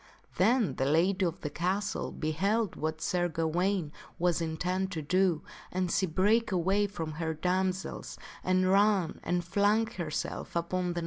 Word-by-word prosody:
Then 225 - +3
the 130 - +1
lady 180 +7 +3
of 170 - -5
the 150 - -4
castle 190 +6 -1
beheld 195 +8 0
what 155 0 -3
Sir 175 -1 +1
Gawaine 170 +1 0 0.3
was 175 -1 +1
intent 180 +4 -1
to 160 -2 -3
do, 180 0 +2 0.3
and 185 -1 -1
she 190 - +2
brake 205 +7 +2
away 190 +3 +2
from 165 -6 -5
her 160 +1 -3
damsels 185 +3 -2 0.3
and 185 0 +2
ran 195 -4 +3
and 175 -1 -1
flung 205 +5 +3
herself 175 -10 -4
upon 175 +1 -1
the. 170 - -2
180 Hz, 150 wpm, -30 LUFS, 165-195 Hz, 0.3 s, Then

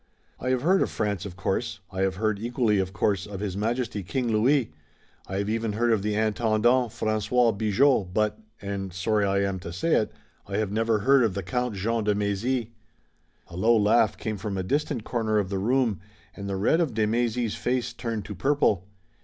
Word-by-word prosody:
"I 130 - -2
have 130 0 +1
heard 190 +4 +4
of - - +1
France, 100 -2 -2
of 90 - -10
course, 100 +3 -2
I 95 0 -3
have 95 -1 +1
heard, 110 0 0
equally 115 -2 +1
of 95 -1 -1
course, 100 +2 0
of 100 -2 -7
His 100 -3 -3
Majesty, 115 0 -1
King 120 +5 -2
Louis, 115 - +2 0.5
I 95 - -3
have 100 +1 -1
even 110 0 -1
heard 120 +2 +1
of 110 -3 +2
the 105 +1 -1
Intendant, 110 +3 +2
François 110 +2 +1
Bigot, 110 -1 +2
but, 105 +2 0 0.2
and 100 -1 -4
sorry 100 +3 +1
I 100 0 +1
am 95 -1 -3
to 85 -1 -7
say 125 - 0
it, 110 - +2 0.4
I - - -3
have 110 -2 -1
never 110 0 +1
heard 135 +2 +5
of 110 -5 0
the 100 - -3
Count 125 +5 -2
Jean 110 +4 -1
de 105 -1 +2
Mézy." 105 +4 -1 0.8
A - - -11
low 115 +6 +4
laugh 105 0 +3
came 110 -2 -3
from 100 0 -4
a 95 - -1
distant 140 - -1
corner 110 -3 0
of 100 -3 0
the 95 - -1
room, 120 0 +1 0.4
and 100 0 -6
the 95 - -2
red 135 - +3
of 155 -9 -1
de 110 -1 +2
Mézy's 115 0 0
face 125 0 -1
turned 115 -4 -4
to 105 - -6
purple. 105 - +1
110 Hz, 205 wpm, -26 LUFS, 100-120 Hz, 0.8 s, heard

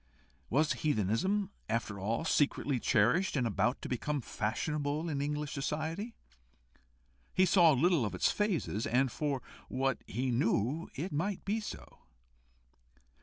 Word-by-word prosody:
Was 150 +5 +3
heathenism 155 - 0 0.2
after 110 -3 -1
all 110 +10 -1
secretly 140 -3 +1
cherished, 125 - +3
and 130 -4 +1
about 115 +3 0
to - - -3
become 145 +4 -1
fashionable 145 +7 -2
in 140 -3 -1
English 150 0 -2
society? 160 - -3 1.2
He 185 - +5
saw 175 -2 +6
little 165 +1 +3
of 105 - -2
its - - +3
phases, 180 - -1
and 130 +1 +2
for 140 -2 -2 0.2
what 135 0 0
he 125 +3 -1
knew 120 - +1
it 175 +7 -3
might 180 +6 -2
be 210 +3 0
so. 210 - -8
145 Hz, 130 wpm, -32 LUFS, 120-165 Hz, 1.2 s, saw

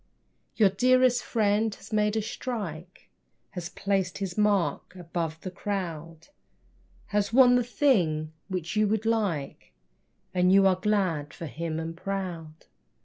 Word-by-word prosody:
Your 205 -4 +4
dearest 255 +3 +3
friend 215 -1 +1
has 215 +2 -13
made 210 0 +2
a 220 - 0
strike, 195 -7 -6 0.4
Has 180 -1 -6
placed 195 -2 -1
his 195 -3 -4
mark 195 -5 +1
above 165 -2 -4
the 185 - -6
crowd, 170 -5 -5 0.8
Has 205 0 0
won 250 0 +7
the 245 0 +3
thing 175 - +1
which 185 -1 -4
you 215 0 +3
would 220 +1 -1
like 205 -11 -2 0.6
And 180 0 +3
you 195 0 +6
are 190 -1 +5
glad 185 -7 -1
for 170 - -7
him, 160 +1 -4
and 165 0 -5
proud. 170 -4 -5
195 Hz, 140 wpm, -27 LUFS, 165-215 Hz, 0.8 s, won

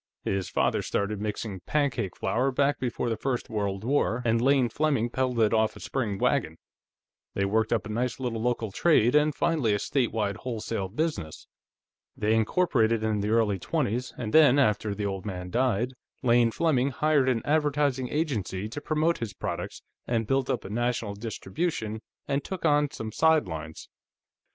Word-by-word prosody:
His 95 -2 -2
father - - +1
started 100 0 -2
mixing 105 -2 -4
pancake 130 - -1
flour 125 +8 +1
back 140 +2 +1
before 125 -1 -2
the 115 - 0
First 125 +1 -3
World 100 -2 -2
War, 125 -2 +1
and 115 0 +2
Lane 135 -1 +4
Fleming 130 -2 0
peddled 130 -2 0
it 110 0 +3
off 110 0 +2
a - - -10
spring 110 -7 -2
wagon. - - 0 0.8
They 100 - +1
worked 110 +2 +1
up 115 -2 +1
a - - -7
nice 120 +3 -2
little 120 -4 -2
local 115 -3 -1
trade, 125 - +3
and 150 0 +3
finally 135 -11 +1
a - - +1
state 125 +3 0
wide 105 -3 -1
wholesale 115 -5 -4
business. 110 - -3 0.7
They 105 +1 +1
incorporated 115 -2 +2
in 110 -1 0
the 105 - -1
early 110 -3 +2
twenties, 125 - -1
and 110 -3 -4
then, 150 -4 +7
after 105 -5 +2
the 105 0 -3
old 95 -2 -3
man 90 -2 -5
died, 125 +1 +1 0.3
Lane 120 -1 +4
Fleming 140 0 +1
hired 145 -1 +2
an 120 -3 0
advertising 145 -4 +1
agency 110 - -2
to 130 +6 -6
promote 155 +3 +1
his 110 -6 -5
products, - - -5 0.2
and 115 -2 0
built 135 +3 0
up - - -1
a - - -6
national 120 -2 -1
distribution, 110 - -3 0.3
and 140 0 0
took 190 -3 -5
on 145 -1 +3
some 110 -5 -6
sidelines. 90 - 0
115 Hz, 170 wpm, -27 LUFS, 105-140 Hz, 0.8 s, then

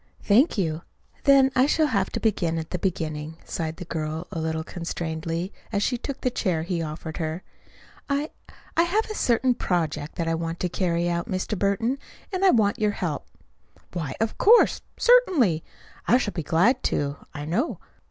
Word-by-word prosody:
"Thank 235 +9 +4
you. 160 -4 0 0.4
Then 275 -2 +6
I 255 +2 +5
shall 315 +1 +3
have 200 -9 +1
to - - -1
begin 175 -7 +1
at 160 0 -5
the 180 - -2
beginning," 160 -4 -3
sighed 160 -1 -3
the 180 - -7
girl 160 0 -3
a 165 - -3
little 160 0 -2
constrainedly 165 +1 -4 0.2
as 205 -2 0
she 250 - +1
took 270 +3 -5
the 255 - +1
chair 175 -8 0
he 170 -1 -2
offered 155 0 -5
her. 160 +2 -3 0.7
"I 285 +2 0 0.4
I - - +5
have 385 +6 +2
a - - -2
certain 250 - +2
project 160 -8 -2
that 170 - -2
I 165 - +1
want 165 +1 -3
to 180 - 0
carry 175 -1 0
out, 170 +5 -1
Mr. 190 +2 -2
Burton, 225 +7 0 0.3
and 370 +1 -1
I - - +7
I - - +7
want 215 - +3
your 210 -1 +2
help." 160 -6 -3 0.7
"Why, 160 -7 -3
of 225 0 -1
course 465 +4 +6 0.2
certainly. 330 - +4 0.4
I 245 - +6
shall 220 -5 -2
be 170 - -2
glad 190 - +3
to, 140 0 0 0.2
I 145 0 -5
know." 220 - -1
180 Hz, 185 wpm, -25 LUFS, 160-240 Hz, 0.7 s, I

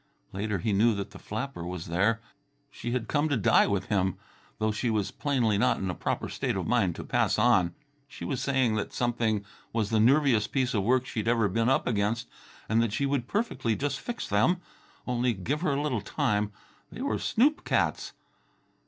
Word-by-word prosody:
Later 105 +1 -1
he 105 +4 -1
knew 110 +3 +4
that 100 -1 -5
the - - -11
flapper 110 -3 -5
was 90 -1 -5
there. 100 +7 +1 0.5
She 120 - -6
had 120 -2 -2
come 150 +1 +1
to 140 - +1
die 105 - +4
with 100 -2 0
him, 95 -3 +1 0.4
though 110 0 +1
she 110 +3 -1
was 105 -3 0
plainly 120 -8 +1
not 125 +2 +3
in 95 -1 -2
a - - -4
proper - - -2
state - - -2
of - - -2
mind 100 -9 +2
to - - -6
pass - - +1
on. 90 -2 +3 0.3
She 140 - -8
was 135 -4 -2
saying 130 -5 +2
that 105 - -3
something 115 -4 0 0.3
was 110 -2 -1
the 110 - +3
nerviest 125 -2 +4
piece 130 -2 0
of 105 - +1
work 125 +5 +2
she'd 110 -4 -3
ever 115 -2 +3
been 115 +5 +1
up 135 - +2
against, 105 0 0 0.4
and 110 +2 +3
that 115 -3 0
she 140 - 0
would 135 -3 -1
perfectly 205 - -1
just 140 +2 -2
fix 240 -1 -5
them... 110 - +2 0.5
only 125 -1 +1
give 130 - -2
her 155 -6 +1
a 140 - 0
little 130 -8 -1
time 105 +1 0 0.4
they 245 - -6
were 280 - -1
snoop 280 +7 +2
cats! - - 0
115 Hz, 200 wpm, -28 LUFS, 105-130 Hz, 0.5 s, knew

